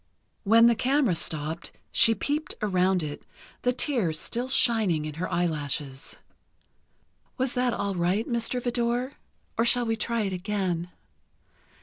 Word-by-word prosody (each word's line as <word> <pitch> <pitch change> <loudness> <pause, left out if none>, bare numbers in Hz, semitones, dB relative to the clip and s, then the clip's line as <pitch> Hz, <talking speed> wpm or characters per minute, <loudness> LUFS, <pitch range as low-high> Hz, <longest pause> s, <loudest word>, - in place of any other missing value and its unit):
When 225 +3 +6
the 235 - +6
camera 255 -1 +2
stopped, 160 0 -3 0.2
she 225 -1 +5
peeped 295 +8 -2
around 185 -3 +2
it, 145 -1 -6 0.4
the 250 - +2
tears 235 - 0
still 245 +7 -2
shining 220 -12 +2
in 155 - -5
her 185 - -2
eyelashes. 145 -5 -2 1.2
"Was 260 -1 0
that 250 -1 +1
all 200 -3 -2
right, 180 +5 0
Mr. 235 +1 0
Vidor? 245 +2 -1 0.4
Or - - +5
shall 240 +1 +2
we 225 0 0
try 230 +1 -1
it 195 -3 -2
again?" 180 -2 -2
215 Hz, 135 wpm, -27 LUFS, 175-240 Hz, 1.2 s, When